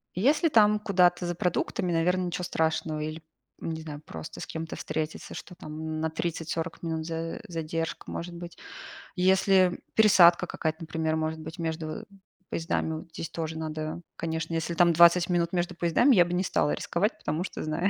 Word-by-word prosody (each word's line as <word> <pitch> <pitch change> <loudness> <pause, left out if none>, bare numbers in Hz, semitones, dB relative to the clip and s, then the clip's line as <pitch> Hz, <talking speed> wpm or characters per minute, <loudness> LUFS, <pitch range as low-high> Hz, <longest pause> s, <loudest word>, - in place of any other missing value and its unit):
Если, 295 - +3
там, 210 -5 +5
куда-то 180 -4 +3
за 175 0 -2
продуктами- 180 0 -1
наверно, 180 +3 +2
ничего 180 0 -3
страшного. 160 -2 0
Или, 155 +1 -4 0.4
не 160 -1 -4
знаю, 150 -2 -8
просто 80 -1 -8
с - - -4
кем-то 160 0 -5
встретиться, 155 0 -4
что, 180 - -9
там, 155 0 -5
на 160 - 0
30-40 165 +1 -3
минут 160 -1 -2
за 165 0 -4
задержка 165 -1 -4
может 175 +1 -5
быть. 170 0 -9 0.6
Если 190 0 +4 0.2
пересадка 185 -6 +6
какая-то, 160 -1 -2
например, 160 -1 -1
может 160 0 -2
быть, 160 +3 -8
между 160 +5 -4 0.4
поездами, 165 -1 -1
вот 170 - -13
здесь 165 0 -6
тоже 160 -1 -4
надо, 155 +1 -4
конечно, 160 0 -3
если 165 +1 -1
там 170 0 +5
20 170 +1 +6
минут 170 -1 +1
между 175 0 -1
поездами, 175 - +4
я 180 - +7
бы 175 0 -4
не 180 +1 +1
стала 150 -5 +1
рисковать, 200 +6 -1
потому 155 +4 -2
что - - -5
знаю. 155 +5 0
165 Hz, 170 wpm, -28 LUFS, 160-180 Hz, 0.6 s, я